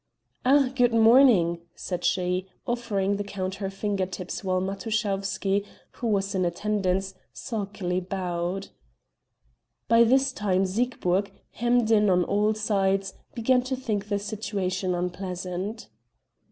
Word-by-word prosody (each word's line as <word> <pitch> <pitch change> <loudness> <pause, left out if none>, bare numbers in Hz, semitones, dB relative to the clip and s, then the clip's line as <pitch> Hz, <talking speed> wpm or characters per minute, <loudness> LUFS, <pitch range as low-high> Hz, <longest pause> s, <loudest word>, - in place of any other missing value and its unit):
"Ah, 270 0 +4
good 245 -3 +3
morning," 225 -7 +6 0.2
said 180 -2 -4
she, 180 0 0 0.2
offering 205 -5 -1
the 205 - -2
count 195 -1 -4
her 195 - -1
finger 195 -1 -2
tips 185 +2 -6
while 185 -1 +1
Matuschowsky, 200 0 -1 0.3
who 240 - -4
was 200 -2 0
in 190 -1 +1
attendance, 190 +1 -1 0.2
sulkily 200 -6 -3
bowed. 185 0 -3 1.2
By 230 0 +6
this 265 +3 +3
time 195 -4 +1
Siegburg, 200 -2 0 0.2
hemmed 240 -1 +1
in 210 -2 +5
on 180 -1 +4
all 210 +3 +1
sides, 195 -2 0 0.2
began 250 +2 +3
to 260 +1 -3
think 215 -6 -3
the 205 - +1
situation 200 -3 -2
unpleasant. 180 - -4
200 Hz, 125 wpm, -26 LUFS, 185-225 Hz, 1.2 s, morning